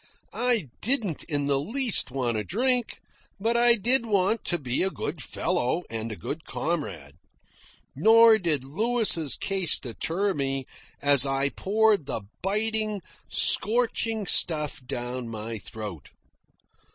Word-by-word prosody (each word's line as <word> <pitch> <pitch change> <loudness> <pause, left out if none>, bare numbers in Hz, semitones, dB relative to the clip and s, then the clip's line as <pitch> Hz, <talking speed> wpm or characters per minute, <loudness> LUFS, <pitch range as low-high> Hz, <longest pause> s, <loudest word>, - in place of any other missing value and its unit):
I 240 - 0
didn't 220 - +1
in 145 -3 -2
the 140 -1 +1
least 230 - +3
want 125 -3 -2
a 105 - -2
drink, 245 - 0 0.4
but 225 +4 0
I 240 0 +5
did 235 +3 +3
want 205 +1 0
to 175 - 0
be 130 -5 -2
a 190 - +2
good 160 -4 -5
fellow 130 +6 -2
and 115 0 -5
a - - -5
good 155 +9 -7
comrade. 85 - -5 0.8
Nor 225 - +5
did 160 -8 0
Louis' 195 - +1
case 190 -5 +3
deter 165 - -2
me, 135 -3 -3 0.4
as 140 -2 +6
I 135 0 0
poured 205 -2 0
the 110 - -4 0.2
biting, 215 +1 -1 0.3
scorching 225 -1 +1
stuff 150 -6 +2
down 120 0 -5
my 110 0 -6
throat. 105 - -9
170 Hz, 130 wpm, -25 LUFS, 135-220 Hz, 0.8 s, as